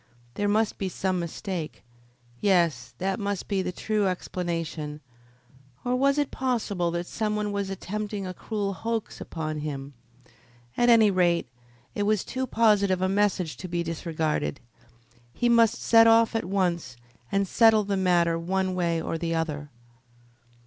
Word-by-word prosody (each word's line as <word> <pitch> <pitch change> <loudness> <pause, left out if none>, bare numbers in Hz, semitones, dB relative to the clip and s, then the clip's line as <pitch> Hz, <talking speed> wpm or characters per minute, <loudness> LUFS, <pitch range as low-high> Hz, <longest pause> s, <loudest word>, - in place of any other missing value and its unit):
There 205 +9 -1
must 215 +1 +1
be 195 - -1
some 185 +1 -1
mistake. 170 -1 -5 0.6
Yes, 165 -11 +1
that 190 +2 -1
must 200 -2 -3
be 195 -2 0
the 180 - -2
true 210 +2 0
explanation; 165 -4 -3 0.9
or 245 +1 +1
was 275 +2 +2
it 290 -2 0
possible 220 -9 -1
that 170 +1 -3
some 215 +3 -2
one 210 -1 -1
was 200 -1 -2
attempting 205 +1 -4
a 185 - -5
cruel 205 +1 -3
hoax 225 +2 -4
upon 155 -2 -4
him? 140 -2 -5 0.8
At 240 0 +3
any 225 -3 +6
rate, 175 -2 +2 0.4
it - - -3
was 210 -1 +2
too 260 0 -3
positive 205 -5 +3
a - - +3
message 195 -4 0
to 185 - -7
be 175 0 -1
disregarded. 160 -3 -2 0.8
He 240 - +1
must 230 -2 +5
set 225 0 +6
off 225 0 +5
at 225 - 0
once 175 -9 -1 0.3
and 195 0 +1
settle 225 +1 +5
the 200 0 -1
matter 175 -3 +2
one 185 +2 -1
way 170 -2 0
or 165 0 -3
the 165 0 -1
other. 150 -3 -3
190 Hz, 155 wpm, -26 LUFS, 170-210 Hz, 0.9 s, any